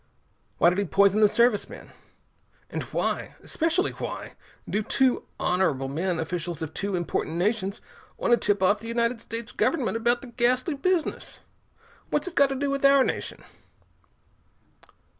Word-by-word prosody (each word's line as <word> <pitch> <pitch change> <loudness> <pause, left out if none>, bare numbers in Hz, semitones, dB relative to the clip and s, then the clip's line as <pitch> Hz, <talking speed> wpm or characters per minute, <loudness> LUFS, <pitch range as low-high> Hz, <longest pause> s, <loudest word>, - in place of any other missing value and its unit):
Why 170 - +5
did 180 - -1
he 200 - +1
poison 200 +3 +3
the 210 - +8
Service 235 0 +2
men? - - -11 0.8
And - - -3
why - - -2
especially 335 +4 0
why - - -6 0.3
do 210 - 0
two 255 +4 +1
honorable 155 -8 +1
men, 170 +5 -1
officials 170 0 -3
of 160 - -6
two 200 -1 -2
important 170 -2 -2
nations, 195 +2 -1 0.4
want - - -1
to 240 - +7
tip 205 -4 0
off 205 +3 +3
the 225 - -9
United 235 0 0
States 230 +1 -5
Government 275 -9 0
about 235 +2 +1
the 255 - -10
ghastly 250 +6 +1
business? 340 +3 -1 0.7
What's - - -1
it 365 - -5
got 280 -4 +4
to 270 - -2
do 280 +1 -1
with 275 0 -2
our 275 -1 +6
nation?" - - -4
225 Hz, 160 wpm, -26 LUFS, 190-260 Hz, 0.8 s, the